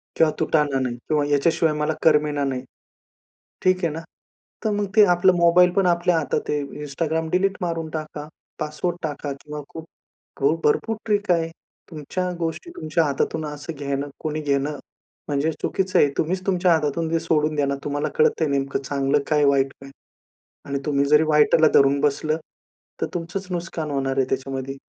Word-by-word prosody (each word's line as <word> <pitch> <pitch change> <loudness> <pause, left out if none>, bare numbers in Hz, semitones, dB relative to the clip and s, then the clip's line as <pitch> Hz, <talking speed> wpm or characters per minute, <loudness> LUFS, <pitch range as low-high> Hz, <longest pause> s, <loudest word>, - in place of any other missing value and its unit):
किंवा 160 -1 +4
तुटण 150 -3 +1
नाही 125 -2 -2
किंवा 150 -2 +2
याच्याशिवाय 155 +2 +2
मला 150 +1 0
करमेना 150 -2 +3
नाही. 130 -2 -2 1.0
ठीक 185 0 +2
आहे 160 - -1
ना 165 - -5 0.6
तर 220 - +1
मग 205 0 0
ते 215 - +8
आपलं 180 +1 +4
मोबाईलपण 180 +2 +4
आपल्या 175 0 +2
हातात 155 - -2
आहे. 150 - 0 0.2
Instagram 160 +2 -2
डिलीट 195 +2 +1
मारून 165 -2 -2
टाका, 155 -1 -6 0.3
पासवर्ड 155 +3 -2
टाका 145 -2 -3
किंवा 150 0 -7
खूप 160 -1 -9 0.6
हो, 140 +3 +3
भरपूर 225 +9 +1
ट्रिक 205 -3 +1
आहे. 165 -1 +1 0.4
तुमच्या 165 +4 -3
गोष्टी 165 - -3
तुमच्या 155 +1 0
हातातून 150 +1 -1
असं 150 +2 -6
घेणं 140 -1 -3
कोणी 155 0 -3
घेणं 145 0 -1 0.5
म्हणजे 145 +2 0
चुकीचं 190 -1 0
आहे. 145 - +5
तुम्हीच 185 +4 -1
तुमच्या 180 -2 +3
हातातून 160 +1 0
ते 165 - +2
सोडून 155 -1 +1
द्या 145 -1 +1
ना. 140 0 -1
तुम्हाला 145 0 -1
कळतंय 460 -1 +3
नेमकं 140 -1 -1
चांगलं 140 +1 0
काय 150 -1 +2
वाईट 135 -1 +2
काय? 135 0 -11 0.7
आणि 140 0 -2
तुम्ही 140 -2 +1
जरी 150 +2 +5
वाईटला 155 +1 +5
धरून 140 0 +5
बसलं. 150 +2 +1 0.6
तर - - +2
तुमचंच 175 +3 -4
नुकसान 170 -3 -4
होणार 135 -1 -1
आहे 135 - +3
त्याच्यामध्ये 135 0 -3
155 Hz, 165 wpm, -23 LUFS, 145-170 Hz, 1.0 s, ते